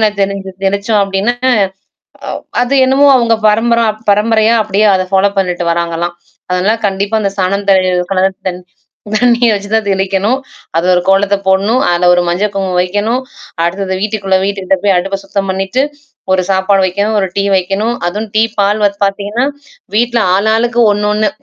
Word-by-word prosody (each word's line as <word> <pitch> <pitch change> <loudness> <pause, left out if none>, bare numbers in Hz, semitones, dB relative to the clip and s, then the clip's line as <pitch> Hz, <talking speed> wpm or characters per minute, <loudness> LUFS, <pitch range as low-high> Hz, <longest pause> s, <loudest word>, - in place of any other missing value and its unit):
என்ன 215 -1 +3
தெளிஞ்ச 195 -1 -4
தெளிச்சோம் 200 +2 0
அப்டின்னா, 195 +5 -1 0.9
அ - - -4 0.3
அது 250 +3 -2
என்னமோ 275 +2 +4
அவங்க 235 -2 +2 0.2
பரம்பரா 230 +2 +2 0.2
பரம்பரையா 220 +2 +2
அப்டியியே 210 +1 +1
அத 185 0 -1
ஃபாலோ 195 +1 +3
பண்ணிட்டு 180 -2 -1
வராங்கலாம். 170 0 -3 0.4
அதனால 185 +4 +1
கண்டிப்பா 200 +2 -2
அந்த 195 - -1
சாணம் 200 +2 -1
தி - - +7 0.4
கல 190 0 +2 0.2
தி 185 - -1 0.6
தண்ணீர் 240 0 +3
வச்சு 205 0 -4
தான் 220 -1 +1
தெளிக்கணும். 195 +5 0 0.4
அது 170 - 0
ஒரு 180 - +2
கோலத்த 200 +1 +3
போடணும். 200 +6 +2
அதுல 175 0 +2
ஒரு 180 - +3
மஞ்சள் 195 +4 0
குங்குமம் 190 -2 -1
வைக்கணும். 205 +7 -1 0.4
அடுத்தது 190 +2 -2
வீட்டுக்குள்ள 200 -2 0
வீட்டுக்கிட்ட 195 -1 -1
போய் 200 -2 +3
அடுப்ப 195 +2 -2
சுத்தம் 195 0 -3
பண்ணிட்டு, 195 +7 -1 0.5
ஒரு 185 -1 +1
சாப்பாடு 190 +1 +2
வைக்கணும், 200 +4 -1
ஒரு 190 - 0
டீ 200 - +2
வைக்கணும். 195 +5 -1 0.2
அதும் 210 +5 -5
டீ 220 - +5 0.2
பால் 205 +1 +1
வந்து 200 0 0
பார்த்தீங்கன்னா, 205 +5 -2 0.5
வீட்ல 240 0 +1
ஆள் 205 +3 +1
ஆளுக்கு 240 +1 +1
ஒண்ணு 210 0 -1
ஒண்ணு. 215 0 +1
200 Hz, 160 wpm, -13 LUFS, 190-215 Hz, 0.9 s, தி